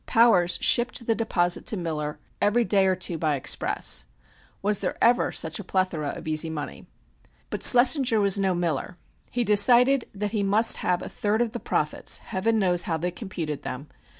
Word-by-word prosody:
Powers 190 Hz, -7 st, +3 dB
shipped 240 Hz, 0 st, 0 dB
the 225 Hz, -, +1 dB
deposits 180 Hz, -6 st, 0 dB
to 215 Hz, -, -3 dB
Miller 150 Hz, -4 st, -4 dB, 0.2 s
every 230 Hz, +3 st, +2 dB
day 195 Hz, -3 st, +2 dB
or 185 Hz, -, +1 dB
two 175 Hz, -3 st, -4 dB
by 155 Hz, -2 st, 0 dB
express. 130 Hz, -, 0 dB, 0.6 s
Was 205 Hz, 0 st, +1 dB
there 185 Hz, -, -4 dB
ever 240 Hz, +1 st, +2 dB
such 160 Hz, +3 st, -4 dB
a -, -, -7 dB
plethora 180 Hz, -6 st, -2 dB
of 165 Hz, -, -10 dB
easy 155 Hz, +1 st, 0 dB
money? 150 Hz, -2 st, -7 dB, 0.6 s
But -, -, -5 dB
Schlessinger 245 Hz, -2 st, +5 dB
was 200 Hz, -1 st, +3 dB
no 190 Hz, -2 st, 0 dB
Miller. 175 Hz, 0 st, -3 dB, 0.3 s
He 245 Hz, -, -2 dB
decided 240 Hz, +5 st, +4 dB
that 205 Hz, +1 st, -4 dB
he 215 Hz, -2 st, -2 dB
must 205 Hz, +3 st, +4 dB
have 180 Hz, -1 st, -2 dB
a -, -, -6 dB
third 210 Hz, +1 st, -2 dB
of 240 Hz, -2 st, -1 dB
the -, -, -6 dB
profits -, -, -2 dB
(Heaven 225 Hz, +4 st, -2 dB
knows 180 Hz, -4 st, +2 dB
how 165 Hz, -, 0 dB
they 175 Hz, +3 st, -3 dB
computed 170 Hz, -, -6 dB
them!) 140 Hz, +3 st, -7 dB
190 Hz, 180 wpm, -24 LUFS, 170-225 Hz, 0.6 s, Schlessinger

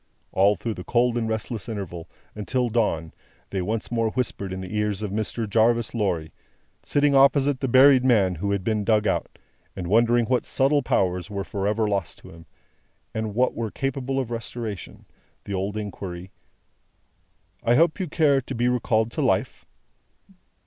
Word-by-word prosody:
All 100 Hz, +2 st, +4 dB
through 115 Hz, +1 st, -4 dB
the 90 Hz, -, -8 dB
cold 120 Hz, +3 st, +1 dB
and 115 Hz, -2 st, -1 dB
restless 110 Hz, 0 st, -4 dB
interval, 90 Hz, -6 st, -6 dB, 0.3 s
until 120 Hz, +4 st, -1 dB
dawn, 85 Hz, -8 st, 0 dB, 0.4 s
they 95 Hz, -, -1 dB
once 110 Hz, +6 st, -3 dB
more 115 Hz, -1 st, +1 dB
whispered 110 Hz, -5 st, -3 dB
in 95 Hz, -, -4 dB
the 95 Hz, +3 st, -6 dB
ears 105 Hz, -1 st, -1 dB
of 105 Hz, -, -3 dB
Mr. 110 Hz, +2 st, -2 dB
Jarvis 115 Hz, +2 st, +2 dB
Lorry 90 Hz, -9 st, -1 dB, 0.5 s
sitting 145 Hz, 0 st, +2 dB
opposite 140 Hz, 0 st, +4 dB
the 135 Hz, -, -1 dB
buried 130 Hz, +1 st, +6 dB
man 105 Hz, -8 st, +3 dB
who 95 Hz, +4 st, -3 dB
had 100 Hz, -2 st, -1 dB
been 110 Hz, 0 st, 0 dB
dug 105 Hz, 0 st, +2 dB
out, -, -, -1 dB, 0.4 s
and 90 Hz, -, -5 dB
wondering 115 Hz, +5 st, +3 dB
what 125 Hz, +1 st, +1 dB
subtle 145 Hz, +2 st, +2 dB
powers 90 Hz, -4 st, 0 dB
were 100 Hz, -1 st, -3 dB
for 100 Hz, 0 st, -3 dB
ever 105 Hz, +1 st, +1 dB
lost 100 Hz, -5 st, -2 dB
to -, -, -14 dB
him, 85 Hz, 0 st, -15 dB, 0.7 s
and 110 Hz, -2 st, -3 dB
what 125 Hz, +2 st, +2 dB
were 115 Hz, -1 st, -3 dB
capable 135 Hz, +2 st, -2 dB
of 125 Hz, -3 st, -3 dB
restoration 115 Hz, -3 st, -6 dB, 0.4 s
the 100 Hz, -, -6 dB
old 100 Hz, +2 st, -2 dB
inquiry: 95 Hz, -3 st, -6 dB, 1.3 s
"I 120 Hz, -, +3 dB
hope 165 Hz, +5 st, +3 dB
you 185 Hz, -, -2 dB
care 145 Hz, -4 st, +3 dB
to 130 Hz, +1 st, -7 dB
be 120 Hz, +1 st, +1 dB
recalled 115 Hz, -2 st, +1 dB
to -, -, -3 dB
life?" -, -, 0 dB
110 Hz, 170 wpm, -24 LUFS, 100-125 Hz, 1.3 s, buried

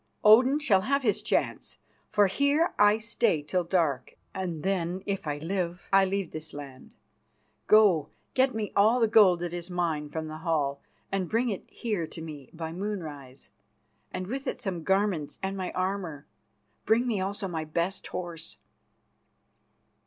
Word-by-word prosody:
Odin 250 Hz, +7 st, +7 dB
shall 215 Hz, -11 st, +3 dB
have 275 Hz, +7 st, 0 dB
his 210 Hz, -5 st, +1 dB
chance, -, -, -1 dB, 0.3 s
for 205 Hz, -, +4 dB
here 280 Hz, -, +2 dB
I 205 Hz, +1 st, +6 dB
stay 215 Hz, -7 st, 0 dB
till 180 Hz, +4 st, 0 dB
dark, 165 Hz, -7 st, 0 dB, 0.2 s
and 175 Hz, -5 st, -4 dB
then, 185 Hz, -1 st, -1 dB
if 195 Hz, -4 st, -3 dB
I 145 Hz, -1 st, -1 dB
live, 175 Hz, +2 st, -3 dB
I 195 Hz, 0 st, +6 dB
leave 195 Hz, -2 st, -2 dB
this 155 Hz, -1 st, -7 dB
land. 140 Hz, -3 st, -10 dB, 0.7 s
Go, 195 Hz, -9 st, +5 dB, 0.2 s
get 260 Hz, -1 st, +2 dB
me 215 Hz, -2 st, -2 dB
all 220 Hz, +5 st, +5 dB
the 225 Hz, -, +4 dB
gold 200 Hz, -6 st, +5 dB
that 175 Hz, -1 st, -3 dB
is 175 Hz, 0 st, -5 dB
mine 165 Hz, -4 st, -1 dB
from 160 Hz, +1 st, -4 dB
the 155 Hz, 0 st, -6 dB
hall, 150 Hz, -4 st, -1 dB, 0.3 s
and 190 Hz, -3 st, -1 dB
bring 235 Hz, +2 st, +1 dB
it 200 Hz, -, -5 dB
here 205 Hz, -8 st, -3 dB
to 160 Hz, -, -10 dB
me 150 Hz, -4 st, -8 dB
by 160 Hz, -1 st, -6 dB
moonrise, 155 Hz, -9 st, -6 dB, 0.6 s
and 185 Hz, -, -4 dB
with 265 Hz, +7 st, -5 dB
it -, -, -2 dB
some 190 Hz, -8 st, -3 dB
garments 190 Hz, -4 st, 0 dB
and 190 Hz, +1 st, -2 dB
my 185 Hz, -2 st, -3 dB
armour. 185 Hz, -6 st, -3 dB, 0.6 s
Bring 230 Hz, +3 st, +3 dB
me 220 Hz, -6 st, 0 dB
also 195 Hz, +1 st, -2 dB
my 165 Hz, -3 st, -3 dB
best 170 Hz, +5 st, -2 dB
horse." 175 Hz, -3 st, -6 dB
185 Hz, 160 wpm, -28 LUFS, 160-210 Hz, 0.7 s, Odin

